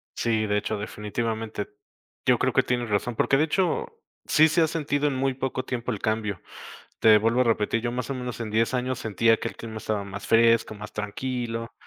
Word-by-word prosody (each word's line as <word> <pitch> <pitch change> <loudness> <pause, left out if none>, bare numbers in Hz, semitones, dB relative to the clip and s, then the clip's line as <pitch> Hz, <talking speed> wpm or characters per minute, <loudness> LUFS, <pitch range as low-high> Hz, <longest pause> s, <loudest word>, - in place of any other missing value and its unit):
Sí, 110 -2 +1
de 105 -1 +1
hecho, 105 +1 -2
definitivamente. 110 +1 -4 0.6
Yo - - +4
creo - - +1
que - - +4
tienes 120 -2 -1
razón, 105 +3 0
porque 135 - +3
de 155 - +3
hecho, 175 +2 0 0.4
sí 155 +1 +6
se 165 +2 +2
ha 160 - +4
sentido 150 -2 0
en 140 - -1
muy 135 +1 0
poco 130 0 -3
tiempo 125 -1 -3
el 105 - -4
cambio. 110 -4 -1 0.6
Te 110 -1 +7
vuelvo 115 +3 +2
a - - +5
repetir, 115 -1 +1
yo 120 +1 -2
más 125 +1 -3
o - - -1
menos 125 -2 -5
en 110 -2 -4
10 115 +3 +1
años 125 0 -1
sentía 115 +1 +2
que - - -3
el - - -12
clima 110 -1 -7
estaba 105 -2 -2
más 100 0 -7
fresco, 115 -1 +4
más 105 0 -9
tranquilo, 115 +2 -4
115 Hz, 210 wpm, -26 LUFS, 110-130 Hz, 0.6 s, Te